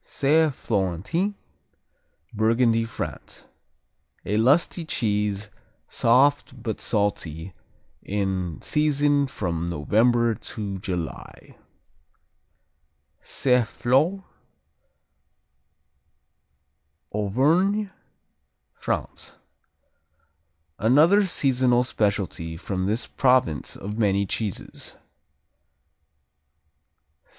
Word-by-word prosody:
Saint 150 +1 +2
Florentin 105 - -1 1.0
Burgundy, 115 +1 +2
France 115 - -7 0.8
A 105 - -1
lusty 140 +9 +2
cheese, 105 -7 -1 0.4
soft 130 +2 +2
but 110 -2 -3
salty, 95 -5 -2 0.5
in 95 -4 -2
season 145 -1 +2
from 85 -8 -3
November 115 +9 +2
to 100 -3 -6
July. 90 -4 -6 1.6
Saint 125 -3 +1
Flour 155 - +1 2.9
Auvergne, 160 - +1 0.8
France - - -4 1.4
Another 160 - +5
seasonal 130 -6 +2
specialty 100 -8 -2
from 95 +1 -3
this 110 +4 -1
province 125 - +1
of 105 +3 -6
many 100 -2 +2
cheeses. 100 +1 -5
115 Hz, 65 wpm, -24 LUFS, 100-140 Hz, 2.9 s, Another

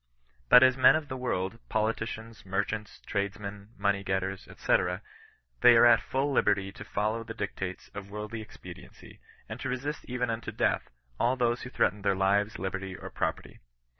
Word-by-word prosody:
But 125 - +9
as 130 0 +5
men 135 +1 +7
of 155 -2 -2
the 130 - -3
world^ 115 -5 -2
politicians, 110 0 -2
merchants, 100 +2 -3
tradesmen, 100 0 -4
money 100 -1 +1
getters, 95 0 -2
&c. - - +3 0.8
they 120 -1 +8
are 120 - +7
at 120 - +7
full 135 +2 -1
liberty 100 -6 +2
to - - -10
follow 110 +2 -1
the 115 0 -8
dictates 95 -3 -5
of 100 -1 -7
worldly 105 +2 -5
expediency, 110 - -12 0.3
and 110 +2 -7
to 135 - -3
resist 135 +4 -3
even 125 -1 -1
unto 115 -1 -4
death - - 0 0.3
all 125 +2 +3
who 120 -1 +2
threaten 105 -4 +1
their 100 -1 +2
lives, 100 +2 +2
liberty, 95 +1 -4
or - - -9
property. - - -3
105 Hz, 165 wpm, -29 LUFS, 100-120 Hz, 0.8 s, But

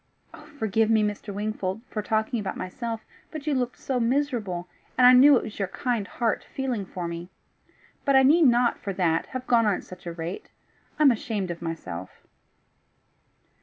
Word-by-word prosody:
Forgive 220 -2 +1
me, 220 -1 +4
Mr. 210 0 -3
Wingfold, 205 0 -3
for 215 - -2
talking 220 +2 0
about 205 - -4
myself, 225 +4 -4 0.3
but 305 -2 -7
you 305 - +1
looked 250 -2 -1
so 260 -2 -2
miserable! 230 -8 -1 0.3
and 250 - +6
I 250 - +9
knew 270 +2 +8
it - - -2
was 215 - -8
your 195 - 0
kind 230 +1 -2
heart 235 -3 -1
feeling 250 -8 -2
for 180 -2 -5
me. 170 +1 -6 0.7
But 275 -2 +3
I 265 - +7
need 305 +3 +6
not, 240 0 +3
for 200 - -4
that, 170 -3 +1
have 255 -1 -6
gone 230 -3 +3
on 205 - +3
at - - -7
such 180 -1 -12
a - - -3
rate. 165 +2 -6 0.5
I 305 - +3
am 280 - +8
ashamed 210 -5 -2
of 170 - -7
myself!" 160 - -5
220 Hz, 185 wpm, -26 LUFS, 185-250 Hz, 0.7 s, I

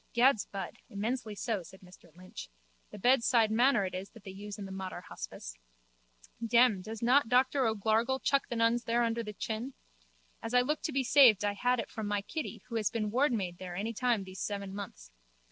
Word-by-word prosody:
Gad's 240 -1 +4
bud, 195 -1 -6
immensely 220 +2 -3
so, 215 -1 -2
said 185 +3 -14
Mr 180 -2 -17
Lynch. 185 - -9 0.4
The - - -10
bedside 235 0 +3
manner 235 -2 +4
it 185 - -5
is 185 +2 -5
that 225 - -16
they 195 - -8
use 200 +1 -8
in 200 - -6
the 195 - -8
Mater 190 -2 -6
hospice. - - -8 0.8
Demme, 230 -3 +4
does 220 +3 -7
not 250 +1 +4
Doctor 260 +1 +3
O'Gargle 225 +4 +1
chuck 275 +1 +1
the 240 - -3
nuns 230 +1 +2
there 235 +1 +2
under 230 0 0
the 210 -2 -6
chin. 225 +6 -4 0.7
As 225 +2 -3
I 250 - +7
look 300 +5 -1
to - - -1
be 275 -1 +1
saved 240 -6 +6
I 205 - +1
had 245 +4 +1
it - - -5
from 220 -2 -4
my 205 -1 -1
Kitty 235 - -5
who 230 -2 -3
has 215 -2 +1
been 215 -3 -2
wardmaid 220 -9 0
there 180 -1 -7
any 215 +5 -3
time 235 -2 +1
these 190 0 -10
seven 200 -2 -4
months. 190 - -8
220 Hz, 205 wpm, -31 LUFS, 200-245 Hz, 0.8 s, I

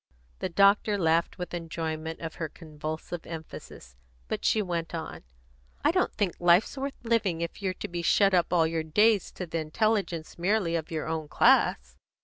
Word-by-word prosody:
The - - -2
doctor 200 +3 +4
laughed 165 -2 +1
with 180 -1 -6
enjoyment 160 -1 -4
of 165 -1 -5
her 160 -2 -4
convulsive 155 +2 -6
emphasis; 160 - -9 0.3
but - - -3
she 220 - +3
went 170 -2 -3
on: 160 -1 -6 0.6
"I - - +6
don't - - +1
think 195 -4 0
life's 175 +7 +4
worth 275 0 -4
living 215 -8 +1
if 170 +4 -5
you're 190 -2 -1
to - - -5
be 170 0 -4
shut 195 +3 +4
up 175 -2 +2
all 170 -2 +4
your 160 0 -1
days 210 +7 +3
to 180 - -5
the 165 -1 -3
intelligence 170 0 -1
merely 185 -2 +1
of 160 -2 -3
your 160 -2 -3
own 160 -1 -3
class." - - +3
170 Hz, 175 wpm, -28 LUFS, 160-195 Hz, 0.6 s, I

